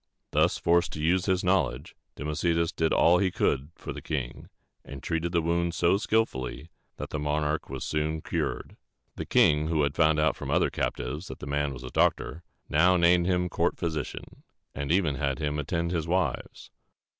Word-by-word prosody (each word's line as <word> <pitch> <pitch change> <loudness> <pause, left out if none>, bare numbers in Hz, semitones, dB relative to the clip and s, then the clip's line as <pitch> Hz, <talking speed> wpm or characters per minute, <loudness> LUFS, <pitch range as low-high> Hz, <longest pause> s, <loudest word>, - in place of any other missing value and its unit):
Thus - - +2
forced 85 +1 +2
to - - -6
use 90 +5 +1
his 95 -1 +1
knowledge, 90 -8 0 0.2
Democedes 80 +2 0
did 80 0 +1
all 85 +1 +5
he 95 - +2
could 70 -4 0
for - - -7
the - - -8
king, 65 -6 -5 0.3
and 70 -1 -10
treated 85 0 -1
the 85 -2 +1
wound 85 +1 0
so 85 +4 +3
skillfully 85 - -1 0.3
that - - -6
the 75 - -2
monarch 75 +1 -1
was 65 -1 -5
soon 75 +1 -1
cured. - - -3 0.4
The - - -6
king, 75 0 +4
who 80 -2 +1
had 70 -1 0
found 80 -1 +3
out 75 -2 +2
from - - -7
the - - 0
other - - +2
captives 75 +9 -3
that - - -8
the - - -8
man 70 0 -1
was 65 -1 -8
a 65 - -7
doctor, 80 - +1 0.3
now 90 +4 +4
named 85 0 +4
him 90 -1 +1
court - - 0
physician, 80 -5 -5 0.3
and 70 +2 -3
even 85 -6 +2
had 70 -3 -1
him 75 -1 -2
attend 85 +3 -2
his 85 -2 -2
wives. 85 -7 -2
80 Hz, 190 wpm, -27 LUFS, 75-85 Hz, 0.4 s, all